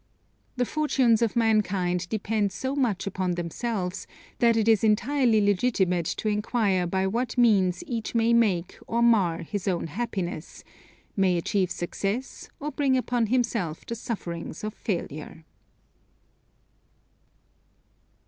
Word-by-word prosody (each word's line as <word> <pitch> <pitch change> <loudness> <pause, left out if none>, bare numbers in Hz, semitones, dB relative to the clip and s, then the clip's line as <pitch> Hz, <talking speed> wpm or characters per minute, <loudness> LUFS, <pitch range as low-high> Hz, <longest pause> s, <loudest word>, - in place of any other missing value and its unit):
The 250 -1 +1
fortunes 260 -6 +2
of 230 -1 +1
mankind 195 -6 +1
depend 215 -1 0
so 260 +8 -3
much 235 -9 0
upon 185 -2 -1
themselves, 180 +2 -3 0.3
that 235 -2 +4
it 220 -1 +1
is 220 -2 +4
entirely 225 +2 +3
legitimate 195 -4 +1
to - - -3
enquire 210 -3 +1
by 190 +2 0
what 240 +6 -2
means 200 - +3
each 235 -6 -4
may 230 0 +3
make 195 -7 +1
or 235 +1 +1
mar 185 -8 +3
his 200 +4 -5
own 180 -3 0
happiness; 180 -3 -4 0.5
may 185 -3 +3
achieve 185 +1 0
success 195 +8 -4
or 300 0 -4
bring 270 -2 +2
upon 245 -2 0
himself 225 -9 -1
the - - -4
sufferings 175 -8 -5
of 215 0 -3
failure. 165 -6 -5
210 Hz, 125 wpm, -26 LUFS, 180-235 Hz, 0.5 s, that